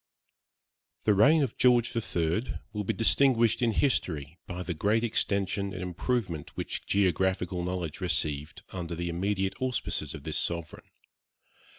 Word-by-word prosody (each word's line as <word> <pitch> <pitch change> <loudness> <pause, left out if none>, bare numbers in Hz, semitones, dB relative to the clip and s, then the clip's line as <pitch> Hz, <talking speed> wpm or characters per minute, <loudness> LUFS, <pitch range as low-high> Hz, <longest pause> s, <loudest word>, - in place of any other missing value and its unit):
The 105 - +4
reign 145 +10 +5
of 135 - -3
George 120 -1 +4
III 90 -1 -1 0.2
will 105 -1 -2
be - - 0
distinguished 115 -1 +3
in 120 -2 +3
history 85 - 0
by 90 0 -4
the 90 - -3
great 105 +8 +1
extension 100 -3 0
and 90 - -5
improvement 90 - -2
which - - -4
geographical 95 -1 +1
knowledge 90 -2 -3
received 75 -5 -1
under 85 -2 -4
the 85 +1 -3
immediate 95 +2 -1
auspices 130 -1 -1
of - - -9
this - - -1
sovereign. 85 -1 -4
95 Hz, 140 wpm, -29 LUFS, 85-115 Hz, 0.2 s, reign